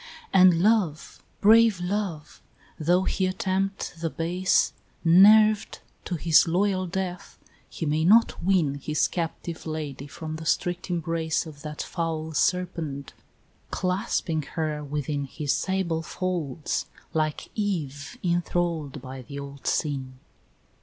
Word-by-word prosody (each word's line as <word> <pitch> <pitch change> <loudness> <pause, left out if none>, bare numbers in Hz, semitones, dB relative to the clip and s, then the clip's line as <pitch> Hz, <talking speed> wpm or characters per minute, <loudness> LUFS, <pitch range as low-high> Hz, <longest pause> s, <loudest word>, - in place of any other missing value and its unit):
And 180 -3 +6
Love, 200 -8 +1 0.2
brave 220 -1 +6
Love! 180 -4 -3 0.4
though 175 +4 +3
he 190 0 0
attempt 190 +1 -2
the 165 - 0
base, 180 +4 +1 0.3
Nerved 210 +5 +6 0.3
to 180 - -2
his 165 0 +4
loyal 185 +2 +1
death, 180 0 -4 0.3
he 165 - -5
may 155 +1 +1
not 220 +7 +4
win 170 -6 +2
His 150 +1 +1
captive 165 -1 -5
lady 150 -3 -5
from 155 +2 -6
the 160 - -8
strict 175 +2 -1
embrace 165 -1 -1
Of 150 -3 -11
that 150 0 -5
foul 160 -2 -3
Serpent, 160 -5 -1 0.6
clasping 180 -4 -1 0.2
her 155 -2 -1
within 145 0 -3
His 145 +1 -2
sable 190 -4 -1
folds 165 -4 -3 0.3
like 155 -1 -1
Eve 155 -10 -3
enthrall'd 170 -5 -1
by 130 0 -7
the 140 +3 -9
old 140 0 -8
Sin. 135 -4 -1
165 Hz, 120 wpm, -26 LUFS, 150-185 Hz, 0.6 s, And